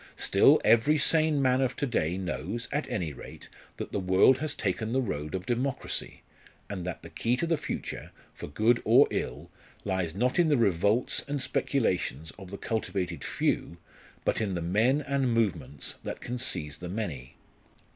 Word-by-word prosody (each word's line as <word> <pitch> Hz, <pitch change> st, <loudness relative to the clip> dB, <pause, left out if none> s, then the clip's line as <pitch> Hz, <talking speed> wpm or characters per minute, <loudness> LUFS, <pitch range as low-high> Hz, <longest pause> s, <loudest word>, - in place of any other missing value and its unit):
Still -, -, +5 dB
every 140 Hz, +7 st, +5 dB
sane 155 Hz, 0 st, +3 dB
man 130 Hz, 0 st, +3 dB
of 130 Hz, -, 0 dB
to 145 Hz, -, -1 dB
day 90 Hz, -, 0 dB
knows, 95 Hz, +5 st, -3 dB
at 145 Hz, +1 st, -2 dB
any 80 Hz, -5 st, -2 dB
rate, -, -, -11 dB, 0.3 s
that -, -, -6 dB
the -, -, -1 dB
world 95 Hz, +7 st, +4 dB
has 155 Hz, -1 st, -3 dB
taken 110 Hz, +3 st, -2 dB
the 130 Hz, -, +2 dB
road 75 Hz, -, -3 dB
of 95 Hz, 0 st, -4 dB
democracy, 125 Hz, +3 st, -2 dB, 0.4 s
and 95 Hz, -3 st, -5 dB
that 90 Hz, -, -5 dB
the -, -, -9 dB
key 120 Hz, +2 st, 0 dB
to 150 Hz, -, 0 dB
the 165 Hz, 0 st, +2 dB
future, -, -, -5 dB, 0.2 s
for -, -, -8 dB
good 110 Hz, +10 st, +2 dB
or 120 Hz, +6 st, +6 dB
ill, -, -, -4 dB, 0.3 s
lies 95 Hz, -4 st, -1 dB
not 125 Hz, -, +1 dB
in 170 Hz, -2 st, +4 dB
the 145 Hz, -, +4 dB
revolts 105 Hz, +2 st, +2 dB
and 145 Hz, 0 st, -2 dB
speculations 90 Hz, -, -1 dB
of 95 Hz, -2 st, -10 dB
the 100 Hz, -, -6 dB
cultivated 90 Hz, -, -3 dB
few, 85 Hz, -, -1 dB, 0.5 s
but -, -, +1 dB
in 100 Hz, -4 st, -1 dB
the 85 Hz, -, -2 dB
men 110 Hz, -, +2 dB
and 135 Hz, -4 st, 0 dB
movements 85 Hz, -, -1 dB
that -, -, -5 dB
can 125 Hz, 0 st, -5 dB
seize 75 Hz, -, -1 dB
the 90 Hz, +2 st, -7 dB
many. 85 Hz, -, -5 dB
110 Hz, 175 wpm, -28 LUFS, 90-130 Hz, 0.5 s, or